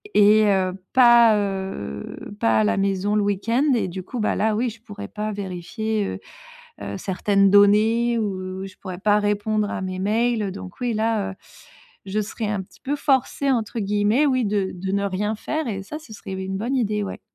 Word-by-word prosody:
et 210 +1 +6
heu, 190 -2 +2 0.2
pas, 240 -3 +7
heu 190 - -5
pas 110 - +3
à - - +3
la 105 - +1
maison 195 +1 0
le 210 - +3
week-end. 205 +6 0
Et 220 - 0
du 185 +1 -6
coup, 245 +6 -6
bah, 215 - +1
là 215 0 +1
oui, 240 +3 0
je 225 0 -12
pourrais 205 -2 -8
pas 215 0 -4
vérifier, 205 +3 -3
heu - - -4 0.6
heu, - - -5
certaines 195 +1 +2
données, 220 +4 +4
ou 190 -2 -3
je 190 - -13
pourrais 185 -2 -7
pas 210 +1 +3
répondre 210 0 0
à - - -3
mes 185 0 -4
mails. 220 +4 +1
Heu, 195 - -2
donc 185 +1 -10
oui, 245 -2 -1
là, 215 -2 0
heu, - - -11 0.7
je 205 +3 -1
serais 215 +1 -4
un 205 -2 -1
petit - - -20
peu 285 +2 -2
forcée 275 0 +1
entre 230 -2 -1
guillemets, 210 +7 +2
oui, 255 -3 +2
de 200 -2 0
de 190 +1 -4
ne 200 0 0
rien 200 +2 -1
faire 305 +4 -3
et 195 -2 -3
ça, 300 +9 -6
ce 300 -8 -14
serait 195 -2 -7
oui, 190 - -4
une 190 0 -3
bonne 240 +6 -1
idée, 210 -4 0
ouais. 195 - -6
205 Hz, 210 wpm, -23 LUFS, 195-225 Hz, 0.7 s, pas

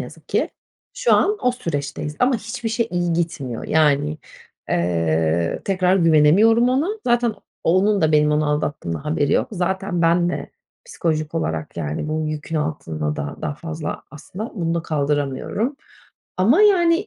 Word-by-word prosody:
yazık 150 +6 -10
ki. - - 0 0.4
Şu - - +1
an 420 +1 +3
o 250 - +3
süreçteyiz 150 - -4
ama 250 0 +3
hiçbir 225 +1 -5
şey 230 +1 -1
iyi 175 -1 0
gitmiyor. 155 -8 -3
Yani, 150 -1 +2 0.5
eee, 85 -1 0
tekrar 185 -1 +2
güvenemiyorum 185 +9 +5
ona. 275 +7 +1 0.2
Zaten 240 -2 +2 0.3
onun 195 +4 +3
da 160 -1 +2
benim 150 0 +4
onu 150 0 +1
aldattığımdan 145 - -2
haberi 150 -1 0
yok. - - +2
Zaten 190 -1 -1
ben 170 +1 +3
de 175 - -4 0.4
psikolojik 160 - -2
olarak, 80 - -3
yani, 75 - -3
bu 155 +1 -1
yükün 155 +1 -4
altında 80 - -3
da 70 0 -4
daha 150 -2 -2
fazla 160 0 -5
aslında 185 +8 -7
bunu 170 -5 -1
da 170 - -1
kaldıramıyorum 150 - -1 0.6
ama, 240 - +4
yani, 365 -2 +4
165 Hz, 150 wpm, -21 LUFS, 145-210 Hz, 0.6 s, güvenemiyorum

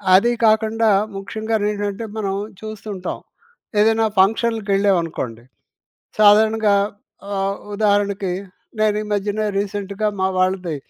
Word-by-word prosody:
అది 235 +6 +4
కాకుండా 220 +1 +3 0.3
ముఖ్యంగానేంటంటే, 210 0 -2
మనం 195 -2 -1 0.3
చూస్తూ 215 0 -8
ఉంటాం. 185 -1 -5 0.6
ఏదైనా 225 +1 +4
ఫంక్షన్‍‌లకెళ్ళేవనుకోండి 195 - +1 0.8
సాధారణంగా 215 0 +5 0.6
ఆహ్, 195 0 -1 0.2
ఉదాహరణకి 200 -2 +1 0.5
నేను 215 -1 +2
ఈ - - -6
మధ్యన 205 +1 -1 0.2
రీసెంట్‌గా 200 +1 -2
మా 190 - +2
వాళ్ళది 185 -3 0
205 Hz, 95 wpm, -20 LUFS, 195-220 Hz, 0.8 s, సాధారణంగా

